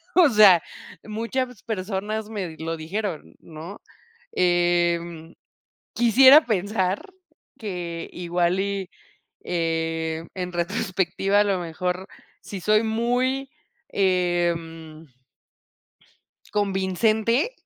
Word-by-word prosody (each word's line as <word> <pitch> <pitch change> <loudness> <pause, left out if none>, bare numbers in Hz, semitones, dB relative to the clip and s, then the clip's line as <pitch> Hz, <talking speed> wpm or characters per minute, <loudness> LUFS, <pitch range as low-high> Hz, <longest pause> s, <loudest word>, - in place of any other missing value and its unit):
o 360 -3 +7
sea, 205 -7 +7 0.4
muchas 230 +2 -3
personas 210 +1 -3
me 185 -7 -5
lo 165 +1 -3
dijeron, 170 +1 -5
¿no? 165 +5 -10 0.5
Em, 175 -2 +1 0.6
quisiera 260 +6 +7
pensar 200 -2 -1 0.5
que 175 -5 -5
igual, 175 +1 0
y, 195 -1 -2 0.5
eh, 165 -1 -2
en 180 -1 -4
retrospectiva, 190 +2 0
a - - +5
lo 200 -2 0
mejor 180 +2 -3 0.3
sí 200 - -7
soy 215 +3 +3
muy, 245 +4 0 0.4
em 170 -4 -1 1.5
convincente 215 - +1
185 Hz, 85 wpm, -24 LUFS, 170-215 Hz, 1.5 s, o